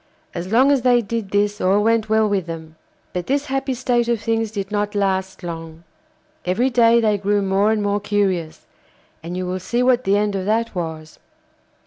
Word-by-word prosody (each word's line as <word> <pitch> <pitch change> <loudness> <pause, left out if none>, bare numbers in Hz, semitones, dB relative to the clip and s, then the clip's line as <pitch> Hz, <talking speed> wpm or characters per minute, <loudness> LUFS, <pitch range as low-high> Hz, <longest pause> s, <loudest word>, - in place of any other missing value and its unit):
As 180 +2 -5
long 260 +5 +5
as 275 -3 +3
they 245 -1 +3
did 220 -1 -4
this 205 +1 0
all 195 +3 +3
went 225 -1 +1
well 220 0 +3
with 195 -4 -1
them. 160 -1 -8 0.4
But 180 -1 -4
this 280 +2 0
happy 270 -1 -2
state 240 -1 0
of 235 -2 +1
things 225 +1 -1
did 200 -2 -5
not 205 0 -1
last 190 -2 -1
long. 165 -1 -7 0.6
Every 230 +9 +1
day 235 -1 +5
they 215 -3 +1
grew 205 +1 +1
more 195 +2 +2
and 215 -1 0
more 205 0 0
curious, 195 -6 -1 0.6
and 170 +2 -6
you 185 - -2
will 185 +1 -3
see 240 +7 -1
what 250 -1 +3
the 200 +1 +2
end 205 -1 0
of 190 -1 -3
that 225 +2 0
was. 160 -3 -6
205 Hz, 195 wpm, -21 LUFS, 185-230 Hz, 0.6 s, long